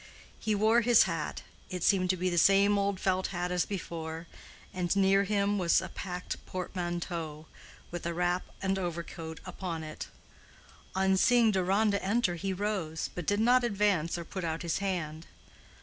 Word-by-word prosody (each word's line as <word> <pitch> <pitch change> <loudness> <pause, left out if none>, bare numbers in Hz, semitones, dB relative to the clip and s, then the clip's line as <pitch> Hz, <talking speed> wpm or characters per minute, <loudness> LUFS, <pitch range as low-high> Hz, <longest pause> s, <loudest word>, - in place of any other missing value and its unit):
He 215 -1 0
wore 220 +3 +4
his 235 -1 +6
hat—it 170 +1 -5
seemed 185 -2 +3
to 185 - +2
be 180 +1 -1
the 175 - -1
same 200 +3 +5
old 200 -1 0
felt 185 -1 +1
hat 180 -1 -3
as 180 -1 +1
before—and 170 0 -5
near 195 0 +4
him 205 0 +1
was 170 -2 +4
a - - -6
packed 180 -1 -5
portmanteau 175 -4 -4 0.5
with 175 -1 -4
a 170 - -2
wrap 180 +1 0 0.2
and 190 0 +1
overcoat 170 -2 -5
upon 170 -4 -5
it. 155 0 -7 0.9
On 190 0 +3
seeing 235 +1 +5
Deronda 200 +2 +2
enter 200 -1 +1
he 190 +3 -3
rose, 190 -5 -2
but 175 -3 -6
did 205 0 +2
not 250 +2 +5
advance 200 -7 +1
or 170 - -6
put 190 +2 -5
out 165 0 -2
his 170 +1 -1
hand. 170 -5 -3
185 Hz, 160 wpm, -30 LUFS, 170-200 Hz, 0.9 s, his